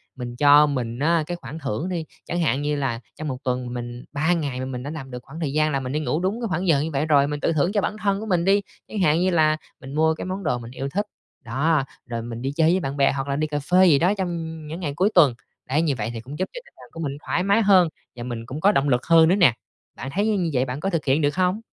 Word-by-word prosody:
mình 120 Hz, -1 st, -6 dB
cho 145 Hz, +2 st, +7 dB
mình 120 Hz, -3 st, -3 dB
á 165 Hz, +1 st, +2 dB
cái 175 Hz, 0 st, -3 dB
khoản 160 Hz, -1 st, -8 dB
thưởng 145 Hz, -, -3 dB
đi, 170 Hz, -3 st, -3 dB, 0.2 s
chẳng 175 Hz, -, -2 dB
hạn 145 Hz, -3 st, +1 dB
như 150 Hz, 0 st, 0 dB
là 135 Hz, -5 st, -2 dB, 0.2 s
trong 155 Hz, -, -5 dB
một 130 Hz, -3 st, -3 dB
tuần 125 Hz, -1 st, -2 dB
mình 120 Hz, 0 st, -6 dB
3 155 Hz, +4 st, +2 dB
ngày 145 Hz, -7 st, -2 dB
mà -, -, -3 dB
mình 125 Hz, -1 st, -5 dB
đã 140 Hz, -, -5 dB
làm 145 Hz, -4 st, -7 dB
được 125 Hz, -, -5 dB
khoảng 155 Hz, +4 st, -10 dB
thời 150 Hz, -5 st, -2 dB
gian 155 Hz, 0 st, +2 dB
là 135 Hz, -, 0 dB
mình 130 Hz, -1 st, -5 dB
đi 150 Hz, -, 0 dB
ngủ 155 Hz, +1 st, -1 dB
đúng 200 Hz, +6 st, -1 dB
cái 230 Hz, -, -1 dB
khoảng 180 Hz, +1 st, -1 dB
giờ 150 Hz, -4 st, +4 dB
như 160 Hz, +1 st, -3 dB
vậy 145 Hz, +2 st, 0 dB
rồi, 140 Hz, -2 st, +4 dB
mình 145 Hz, 0 st, -3 dB
tự 165 Hz, -, +1 dB
thưởng 155 Hz, +4 st, +1 dB
cho 205 Hz, -, +2 dB
bản -, -, -2 dB
thân 200 Hz, -1 st, +1 dB
của 220 Hz, -, -5 dB
mình 180 Hz, -5 st, +1 dB
đi, 200 Hz, +1 st, +4 dB, 0.3 s
chẳng 210 Hz, -, -5 dB
hạn 160 Hz, -3 st, +3 dB
như 185 Hz, -, +2 dB
là 155 Hz, -2 st, +3 dB, 0.2 s
mình 135 Hz, +1 st, -8 dB
mua 160 Hz, +1 st, +3 dB
cái -, -, -6 dB
món 185 Hz, +1 st, -4 dB
đồ 150 Hz, -6 st, 0 dB
mình 115 Hz, 0 st, -9 dB
yêu 135 Hz, +2 st, -4 dB
thích, 205 Hz, +8 st, -1 dB, 0.4 s
đó, 140 Hz, +4 st, +1 dB, 0.2 s
rồi 115 Hz, -1 st, -4 dB
mình 115 Hz, 0 st, -6 dB
đi 135 Hz, -, -2 dB
chơi 160 Hz, 0 st, +4 dB
với 185 Hz, -, +2 dB
bạn 140 Hz, -4 st, -4 dB
bè 140 Hz, -, +4 dB
hoặc 135 Hz, 0 st, -3 dB
là 140 Hz, -, -1 dB
đi 155 Hz, +1 st, 0 dB
cà 145 Hz, -1 st, -2 dB
phê 180 Hz, +6 st, +4 dB
gì 145 Hz, -4 st, +5 dB
đó 180 Hz, +4 st, +3 dB
trong 175 Hz, -3 st, -2 dB, 0.3 s
những 160 Hz, +4 st, -6 dB
ngày 145 Hz, -6 st, -3 dB
cuối 190 Hz, +6 st, +3 dB
tuần. 150 Hz, -8 st, +6 dB, 0.4 s
Đấy, 150 Hz, +5 st, +2 dB
như 150 Hz, -5 st, +1 dB
vậy 110 Hz, -1 st, -2 dB
thì 115 Hz, -, -5 dB
cũng 140 Hz, +7 st, -9 dB
giúp 185 Hz, -, -1 dB
cho -, -, -6 dB
tâm 480 Hz, -, -21 dB
trạng -, -, -15 dB
của 165 Hz, -, -9 dB
mình 140 Hz, -2 st, -3 dB
thoải 180 Hz, -, 0 dB
mái 200 Hz, +3 st, +3 dB
hơn 190 Hz, -4 st, +5 dB, 0.3 s
và 120 Hz, -, -7 dB
mình 120 Hz, -2 st, -5 dB
cũng 130 Hz, +5 st, -6 dB
có 200 Hz, -, +5 dB
động 145 Hz, -7 st, +1 dB
lực 125 Hz, -1 st, +1 dB
hơn 165 Hz, -1 st, +6 dB
nữa 185 Hz, -, +4 dB
nè. 175 Hz, -, +5 dB, 0.4 s
Bạn 135 Hz, -, -5 dB
thấy 205 Hz, +3 st, +1 dB
như 220 Hz, -, +2 dB
như 180 Hz, -5 st, 0 dB
vậy 130 Hz, 0 st, +2 dB
bạn 130 Hz, +2 st, -5 dB
có 195 Hz, -, -1 dB
thực 165 Hz, -5 st, -2 dB
hiện 140 Hz, +3 st, +2 dB
được 145 Hz, +1 st, +1 dB
hông? 185 Hz, +2 st, +1 dB
150 Hz, 310 wpm, -23 LUFS, 135-175 Hz, 0.4 s, cho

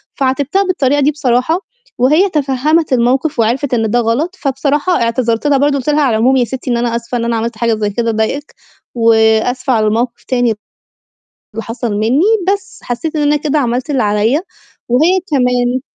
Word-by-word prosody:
فعاتبتها 280 Hz, +8 st, 0 dB
بالطريقة 290 Hz, -7 st, +1 dB
دي 290 Hz, -, +3 dB
بصراحة، 280 Hz, +3 st, 0 dB, 0.4 s
وهي 305 Hz, +11 st, +3 dB
تفهَّمِت 300 Hz, +1 st, 0 dB
الموقِف 255 Hz, +3 st, +1 dB
وعرفِت 250 Hz, +4 st, 0 dB
إن 225 Hz, -2 st, +1 dB
ده 240 Hz, -, +2 dB
غلط، 260 Hz, +11 st, -1 dB
فبصراحة 285 Hz, +4 st, 0 dB
اعتذرت 230 Hz, +2 st, 0 dB
لها 285 Hz, -2 st, +3 dB
برضه 285 Hz, +1 st, +2 dB
قُلت 275 Hz, +2 st, -3 dB
لها: 300 Hz, 0 st, +2 dB
"على 250 Hz, -6 st, +2 dB
العموم 255 Hz, +4 st, +3 dB
يا 245 Hz, -, +2 dB
سِتّي 260 Hz, 0 st, -5 dB
إن 235 Hz, -, +1 dB
أنا 235 Hz, -1 st, -1 dB
آسفة 235 Hz, +1 st, -3 dB
إن 235 Hz, -, -2 dB
أنا 235 Hz, 0 st, 0 dB
عملت 230 Hz, 0 st, -3 dB
حاجة 230 Hz, -1 st, +1 dB
زي 215 Hz, -1 st, -1 dB
كده 230 Hz, +3 st, -1 dB
ضايقِك، 225 Hz, +7 st, -3 dB, 0.4 s
وآسفة 230 Hz, +3 st, +2 dB
على 215 Hz, -1 st, +2 dB
الموقِف 235 Hz, +3 st, -1 dB
تاني 245 Hz, -2 st, +1 dB, 1.0 s
اللي 225 Hz, -, -4 dB
حصل 230 Hz, -1 st, -4 dB
منّي." 225 Hz, +8 st, +1 dB, 0.3 s
بس 395 Hz, -1 st, -6 dB
حسّيت 275 Hz, +7 st, -4 dB
إن 300 Hz, -, 0 dB
أنا 295 Hz, 0 st, +2 dB
كده 300 Hz, 0 st, -1 dB
عملت 250 Hz, +2 st, -1 dB
اللي 270 Hz, -3 st, +1 dB
عليّا 215 Hz, -, +1 dB, 0.5 s
وهي 320 Hz, +10 st, +3 dB
كمان 250 Hz, -2 st, +1 dB
255 Hz, 180 wpm, -14 LUFS, 235-290 Hz, 1.0 s, دي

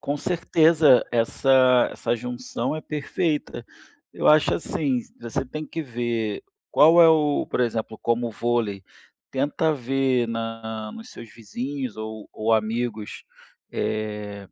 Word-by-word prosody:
Com 145 Hz, -, -2 dB
certeza 160 Hz, -3 st, +4 dB
essa 125 Hz, +2 st, +4 dB
essa -, -, -1 dB
junção 125 Hz, +2 st, -4 dB
é 155 Hz, -, -5 dB
perfeita. 150 Hz, -4 st, -3 dB, 0.5 s
Eu -, -, -2 dB
acho 155 Hz, 0 st, +5 dB
assim, 140 Hz, -6 st, -1 dB, 0.2 s
você 135 Hz, +4 st, -3 dB
tem 155 Hz, +4 st, -7 dB
que 165 Hz, -, -5 dB
ver 120 Hz, -4 st, -3 dB, 0.3 s
qual 165 Hz, +3 st, +6 dB
é 165 Hz, -, +8 dB
o 150 Hz, -2 st, +2 dB
por -, -, -2 dB
exemplo: 110 Hz, -2 st, -2 dB
como 115 Hz, 0 st, 0 dB
vôlei, 110 Hz, -4 st, -1 dB, 0.5 s
tenta 145 Hz, +4 st, 0 dB
ver 130 Hz, -1 st, 0 dB
na 115 Hz, -1 st, -5 dB
nos 225 Hz, +2 st, -11 dB
seus 115 Hz, -2 st, -12 dB
vizinhos 125 Hz, +3 st, -5 dB
ou 110 Hz, -1 st, -7 dB
ou 110 Hz, +1 st, -1 dB
amigos, 110 Hz, 0 st, -3 dB, 0.5 s
eh, 105 Hz, -2 st, -4 dB
120 Hz, 130 wpm, -24 LUFS, 110-145 Hz, 0.5 s, é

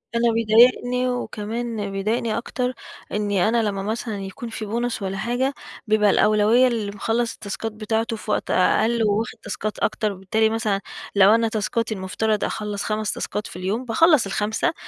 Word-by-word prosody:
أنا 235 Hz, 0 st, +3 dB
بيضايقني، 245 Hz, +3 st, +4 dB
وكمان 225 Hz, -2 st, -3 dB
بيضايقني 215 Hz, +3 st, -1 dB
أكتر، 250 Hz, +1 st, -2 dB, 0.4 s
إنّي 205 Hz, -1 st, +1 dB
أنا 230 Hz, -1 st, +2 dB
لمّا 195 Hz, -2 st, -2 dB
مثلًا 220 Hz, -1 st, -3 dB
يكون 230 Hz, +5 st, -7 dB
في 220 Hz, -1 st, -5 dB
بُونص 235 Hz, +1 st, -2 dB
والّا 195 Hz, 0 st, -3 dB
حاجة، 245 Hz, +5 st, 0 dB, 0.3 s
بيبقى 210 Hz, -1 st, +4 dB
الأولوية 215 Hz, +6 st, +4 dB
للي 220 Hz, -4 st, -2 dB
مخلّص 230 Hz, +3 st, -1 dB
التاسكات 215 Hz, +2 st, -5 dB
بتاعته 220 Hz, +1 st, -2 dB
في 210 Hz, 0 st, -5 dB
وقت -, -, -1 dB
أقل، 225 Hz, +5 st, +3 dB
وواخد 215 Hz, +2 st, 0 dB
تاسكات 215 Hz, 0 st, -4 dB
أكتر، 215 Hz, -1 st, 0 dB
وبالتالي 200 Hz, +4 st, +1 dB
مثلًا 215 Hz, -3 st, -1 dB, 0.3 s
لو 200 Hz, +2 st, +7 dB
أنا 230 Hz, 0 st, +2 dB
تاسكاتي 220 Hz, +1 st, -1 dB
المُفتَرَض 210 Hz, +2 st, -1 dB
أخلّص 210 Hz, -2 st, -3 dB
5 215 Hz, 0 st, -1 dB
تاسكات 210 Hz, -, -4 dB
في -, -, -11 dB
اليوم، 200 Hz, +7 st, -2 dB
باخلّص 300 Hz, -, +4 dB
ال5، 210 Hz, +8 st, -1 dB
220 Hz, 155 wpm, -23 LUFS, 205-235 Hz, 0.4 s, لو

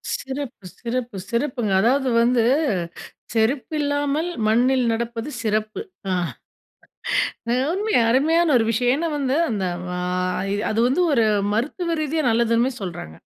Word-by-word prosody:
சிறப்பு! 265 Hz, -6 st, -6 dB
சிறப்பு! 240 Hz, -2 st, -3 dB
சிறப்புங்க! 235 Hz, -3 st, -1 dB
அதாவது 260 Hz, +4 st, +2 dB
வந்து 240 Hz, 0 st, +3 dB, 0.9 s
செருப்பு 240 Hz, +7 st, 0 dB
இல்லாமல் 290 Hz, +2 st, 0 dB, 0.2 s
மண்ணில் 250 Hz, +4 st, +3 dB
நடப்பது 230 Hz, +2 st, -3 dB
சிறப்பு. 215 Hz, -1 st, -1 dB, 0.3 s
ஆ. -, -, +2 dB, 1.6 s
அருமை! 415 Hz, +5 st, -1 dB, 0.2 s
அருமையான 315 Hz, +6 st, +3 dB
ஒரு 225 Hz, -, +2 dB
விஷயம். 245 Hz, +2 st, +2 dB
ஏன்னா 335 Hz, +3 st, -1 dB
வந்து 270 Hz, -1 st, 0 dB
அந்த 205 Hz, -4 st, -1 dB, 0.3 s
வாய் 180 Hz, +2 st, -1 dB, 0.2 s
அது 215 Hz, -, -1 dB
வந்து 275 Hz, +8 st, +2 dB
ஒரு 230 Hz, -4 st, +3 dB, 0.3 s
மருத்துவ 330 Hz, -, -1 dB
ரீதியா 310 Hz, +1 st, -1 dB
நல்லதுன்னு 235 Hz, +2 st, +2 dB
சொல்றாங்க. 165 Hz, -, -6 dB
245 Hz, 115 wpm, -22 LUFS, 220-285 Hz, 1.6 s, வந்து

